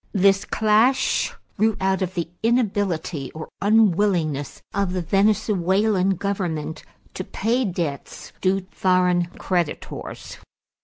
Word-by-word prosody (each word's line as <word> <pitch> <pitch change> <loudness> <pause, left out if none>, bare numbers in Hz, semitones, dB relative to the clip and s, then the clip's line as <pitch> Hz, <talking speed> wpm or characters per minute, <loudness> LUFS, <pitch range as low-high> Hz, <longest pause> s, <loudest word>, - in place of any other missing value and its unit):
This 195 -1 +3
clash 220 +5 +2 0.3
grew 220 0 +2
out 190 0 +1
of 185 0 -2
the 170 -2 -1
inability 200 - 0
or 155 0 -7
unwillingness 190 -8 +2
of 200 -2 0
the 185 - -1
Venezuelan 195 0 +2
government 175 -6 -3 0.3
to 185 - -4
pay 235 +7 0
debts 170 -7 -4
due 190 0 +1
foreign 180 -2 +2
creditors. 175 -5 -3
190 Hz, 105 wpm, -23 LUFS, 175-210 Hz, 0.3 s, This